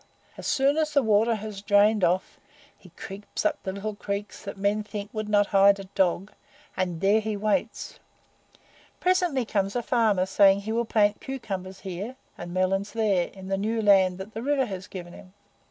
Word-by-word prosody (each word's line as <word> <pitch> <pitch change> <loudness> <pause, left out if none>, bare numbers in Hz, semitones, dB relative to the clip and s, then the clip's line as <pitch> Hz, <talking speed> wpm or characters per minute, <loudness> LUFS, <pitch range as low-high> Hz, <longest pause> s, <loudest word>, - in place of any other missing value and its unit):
As - - -7
soon 280 0 +2
as 305 -1 0
the 280 - +4
water 220 +1 +3
has 210 -2 -7
drained 205 0 +3
off, 180 +2 0 0.4
he - - -17
creeps 195 +2 -7
up - - +1
the 190 - -4
little 200 +2 -4
creeks 200 0 -5
that 200 -1 -7
men 200 +2 +1
think 210 -1 -7
would 215 -1 -4
not 205 -1 +4
hide 200 0 +6
a - - -6
dog, 190 0 -1 0.4
and 180 -3 -2
there 200 +3 +4
he 215 -1 -3
waits. 210 +1 -2 1.0
Presently 360 -8 +1
comes 200 -1 -1
a 240 - -1
farmer 220 -6 +2
saying 195 +1 +4
he 215 +2 -5
will 235 +1 0
plant 210 -2 +2
cucumbers 195 -8 -6
here, 195 +6 -6 0.2
and 175 0 -8
melons 190 +2 0
there, 205 -6 +1
in 190 -1 -12
the 195 0 -1
new 220 +3 -1
land 190 -4 +4
that 195 +3 -9
the 225 - -5
river 275 +1 +1
has 190 -4 -7
given 175 -2 -9
him. 185 -1 -14
205 Hz, 185 wpm, -26 LUFS, 195-220 Hz, 1.0 s, hide